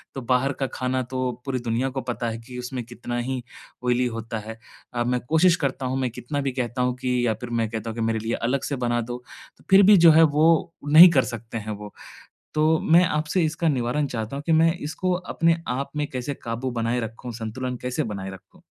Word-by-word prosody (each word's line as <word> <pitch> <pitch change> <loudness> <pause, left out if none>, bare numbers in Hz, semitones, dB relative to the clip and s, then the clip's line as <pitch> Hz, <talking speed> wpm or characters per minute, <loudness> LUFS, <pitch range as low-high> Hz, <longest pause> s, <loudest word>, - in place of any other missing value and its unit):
तो 135 - -4
बाहर 125 +2 +1
का 135 - +1
खाना 130 0 -1
तो 130 0 -2
पूरी 130 -2 -2
दुनिया 120 +3 -1
को 135 0 -4
पता 120 -1 -3
है 115 - -4
कि 125 -1 -8
उसमें 125 0 -5
कितना 120 0 -6
ही 125 +1 -3 0.4
ऑयली 125 0 +2
होता 115 -1 -5
है। 110 +1 -8 0.4
अ, 120 -1 0
मैं 125 +1 0
कोशिश 165 +2 +5
करता 135 -4 -2
हूँ, 130 - -1
मैं 130 -2 0
कितना 125 +5 -4
भी 135 -1 -1
कहता 125 0 -3
हूँ 125 0 +1
कि 125 -1 0
या 110 - +2
फिर 125 - -6
मैं 115 -2 0
कहता 110 0 -4
हूँ 110 - -6
कि 115 - -3
मेरे 115 0 0
लिए 115 +1 -3 0.2
अलग 135 +1 0
से 140 - -2
बना 120 -2 0
दो, 120 +2 -6 0.5
फिर 195 +1 +8
भी 205 +1 +7
जो 165 -1 +8
है 160 +1 +7
वो 160 +2 +3
नहीं 165 +4 +10
कर 135 -5 +4
सकतें 115 0 -6
हैं 110 +1 -6
वो। 105 0 -8 0.6
तो 155 +1 +3
मैं 170 +3 +5
आपसे 155 +3 0
इसका 155 +1 0
निवारण 135 +1 0
चाहता 115 +1 -4
हूँ 140 - -5
कि 165 - +2
मैं 165 +1 +4
इसको 170 +4 -2
अपने 170 -2 +1
आप 135 +3 -2
में 150 0 0
कैसे 130 +2 -3
काबू 120 +3 -3
बनाए 120 +1 -1
रखूँ, 115 +2 -6
संतुलन 120 +3 -4
कैसे 125 0 -1
बनाएँ 100 -3 -5
रखूँ? 95 - -15
125 Hz, 225 wpm, -24 LUFS, 120-145 Hz, 0.6 s, नहीं